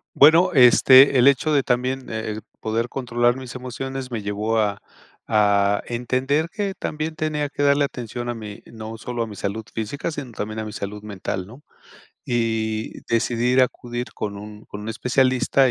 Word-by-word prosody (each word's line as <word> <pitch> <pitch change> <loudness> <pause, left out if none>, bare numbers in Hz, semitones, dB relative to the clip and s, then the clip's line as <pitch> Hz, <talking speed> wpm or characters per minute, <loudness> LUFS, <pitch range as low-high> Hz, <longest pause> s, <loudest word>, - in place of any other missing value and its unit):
Bueno, 165 +5 +7
este, 130 +1 +7
el 125 +2 +7
hecho 140 +3 +2
de 140 -2 +3
también 125 +1 -1
el 110 -1 -4 0.2
poder 115 +2 -1
controlar 120 -1 0
mis 130 -2 -8
emociones 130 +1 -5
me 110 -3 -4
llevó 105 +2 -1
a 100 -2 0 0.5
a 100 -1 +3
entender 130 +6 0
que 200 +1 -3
también 155 +1 -4
tenía 155 -2 -2
que 145 - -3
darle 140 0 +4
atención 120 -2 -5
a 120 - -3
mí, 105 -2 -9
no 110 0 -8
solo 120 +1 -4
a - - -2
mi 105 -2 -9
salud 105 +3 -3
física, 140 +9 -3
sino 140 -5 -7
también 110 0 -5
a 110 - -2
mi 110 - -7
salud 105 0 -6
mental, 95 -3 -5
¿no?, 125 +7 -13 0.7
y 110 -2 -1
decidí 115 +1 +1
ir 130 0 +5
acudir 120 -1 -3
con 100 -1 -4
un 105 +1 -10
con 105 - -8
un 110 - -4
especialista 130 +2 +2
120 Hz, 175 wpm, -22 LUFS, 110-135 Hz, 0.7 s, Bueno